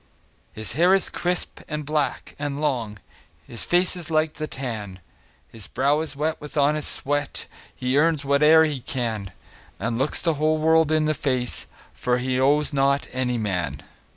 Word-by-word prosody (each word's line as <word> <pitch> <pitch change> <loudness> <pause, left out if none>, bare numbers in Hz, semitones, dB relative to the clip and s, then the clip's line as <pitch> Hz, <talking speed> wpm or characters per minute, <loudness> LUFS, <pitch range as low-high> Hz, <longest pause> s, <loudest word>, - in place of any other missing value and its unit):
His 110 -1 -4
hair 175 +7 +5
is 195 - 0
crisp, 180 0 -1
and 150 -1 -4
black, 150 -1 -2
and 145 -1 -3
long, 120 -8 -1 0.5
His 115 - -4
face 180 +1 +3
is 175 -3 -6
like 155 -1 +1
the 155 0 -4
tan; 110 -9 -6 0.5
His 110 -3 -9
brow 140 +4 +1
is 155 -2 -4
wet 155 +3 -2
with 150 0 -8
honest 150 +1 +2
sweat, 145 +1 -2 0.3
He 130 +2 +1
earns 160 -1 +2
whate'er 150 +3 +6
he 150 -4 -1
can, 115 -6 -3 0.5
And 115 0 -2
looks 135 +3 0
the 165 - +1
whole 155 0 +3
world 160 0 +3
in 155 -1 +3
the 155 - +2
face, 130 -4 -1 0.3
For 125 0 0
he 130 +1 -1
owes 145 +3 +3
not 140 0 +2
any 125 -1 0
man. 95 -6 -2
145 Hz, 170 wpm, -24 LUFS, 125-155 Hz, 0.5 s, whate'er